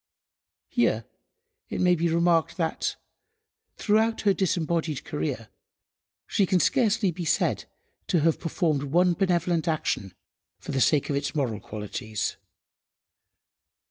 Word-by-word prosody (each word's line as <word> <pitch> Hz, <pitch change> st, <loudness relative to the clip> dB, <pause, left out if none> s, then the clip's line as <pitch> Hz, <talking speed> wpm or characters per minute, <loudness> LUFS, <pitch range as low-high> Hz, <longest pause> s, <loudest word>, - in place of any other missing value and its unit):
Here -, -, +1 dB, 0.6 s
it -, -, -4 dB
may 180 Hz, -1 st, +4 dB
be 170 Hz, 0 st, +1 dB
remarked 170 Hz, 0 st, +2 dB
that, 165 Hz, -3 st, -1 dB, 0.8 s
throughout 220 Hz, +1 st, +2 dB
her 200 Hz, -2 st, +3 dB
disembodied 165 Hz, -5 st, -1 dB
career, 135 Hz, -7 st, -4 dB, 0.8 s
she 195 Hz, -, +1 dB
can 185 Hz, -1 st, +3 dB
scarcely 210 Hz, -2 st, +2 dB
be 175 Hz, +1 st, -6 dB
said 160 Hz, -, +1 dB, 0.4 s
to 170 Hz, -, +2 dB
have 165 Hz, +1 st, +2 dB
performed 160 Hz, -3 st, 0 dB
one 175 Hz, +6 st, +3 dB
benevolent 175 Hz, -2 st, +1 dB
action 100 Hz, -, -1 dB, 0.4 s
for -, -, -7 dB
the 135 Hz, -2 st, 0 dB
sake 140 Hz, +5 st, +3 dB
of -, -, 0 dB
its 140 Hz, +2 st, -2 dB
moral 125 Hz, -8 st, -1 dB
qualities. 105 Hz, -1 st, -4 dB
165 Hz, 120 wpm, -26 LUFS, 140-180 Hz, 0.8 s, may